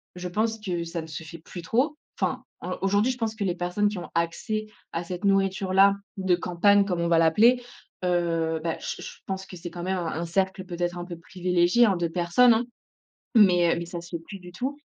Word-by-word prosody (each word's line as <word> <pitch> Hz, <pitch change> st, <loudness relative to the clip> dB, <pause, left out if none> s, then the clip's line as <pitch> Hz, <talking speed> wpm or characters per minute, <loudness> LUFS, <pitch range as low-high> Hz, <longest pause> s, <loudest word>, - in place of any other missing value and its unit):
je 180 Hz, 0 st, -5 dB
pense 220 Hz, +5 st, -1 dB
que 180 Hz, -5 st, -2 dB
ça 170 Hz, 0 st, -4 dB
ne 160 Hz, -, -9 dB
fais 160 Hz, +1 st, -8 dB
plus 175 Hz, +2 st, -9 dB
trop. 265 Hz, -, +1 dB, 0.2 s
Enfin, -, -, -1 dB, 0.2 s
heu, -, -, -3 dB
aujourd'hui 205 Hz, +5 st, +2 dB
je 255 Hz, -, -5 dB
pense 225 Hz, -3 st, -1 dB
que 215 Hz, -, -3 dB
les 180 Hz, -2 st, 0 dB
personnes 180 Hz, +4 st, 0 dB
qui 205 Hz, -1 st, -2 dB
ont 175 Hz, -, -6 dB
accès 190 Hz, +6 st, -1 dB, 0.2 s
à 165 Hz, -, -3 dB
cette 180 Hz, +2 st, -6 dB
nourriture-là, 195 Hz, 0 st, +4 dB, 0.2 s
de 190 Hz, -2 st, +2 dB
campagne 190 Hz, +3 st, +3 dB
comme 180 Hz, -3 st, -1 dB
on 170 Hz, -, +1 dB
va 170 Hz, -1 st, +4 dB
l'appeler, 215 Hz, +10 st, +5 dB, 0.4 s
heu, 165 Hz, -2 st, +1 dB
beh, 165 Hz, -1 st, -1 dB
j -, -, -5 dB
je -, -, -7 dB
pense 190 Hz, 0 st, -4 dB
que 190 Hz, -, -11 dB
c'est 175 Hz, +1 st, -7 dB
quand 175 Hz, 0 st, -6 dB
même 190 Hz, +1 st, -1 dB
un 175 Hz, -2 st, -2 dB
un 165 Hz, +1 st, -3 dB
cercle 190 Hz, +2 st, -1 dB
peut-être, 175 Hz, -1 st, -3 dB
un 175 Hz, -, -5 dB
peu 175 Hz, -1 st, -7 dB
privilégié, 180 Hz, +5 st, +2 dB
hein, 200 Hz, -4 st, +3 dB
de 175 Hz, -1 st, 0 dB
personnes, 180 Hz, +9 st, +4 dB
hein, 230 Hz, +2 st, +1 dB, 0.7 s
mais, 180 Hz, -6 st, +6 dB
heu, -, -, -2 dB
mais 170 Hz, -, -4 dB
ça 170 Hz, 0 st, -6 dB
se 170 Hz, 0 st, -8 dB
fait 165 Hz, -, -5 dB
plus 195 Hz, +3 st, -9 dB
du 180 Hz, -1 st, -12 dB
tout. 265 Hz, +9 st, -3 dB
180 Hz, 230 wpm, -26 LUFS, 170-200 Hz, 0.7 s, mais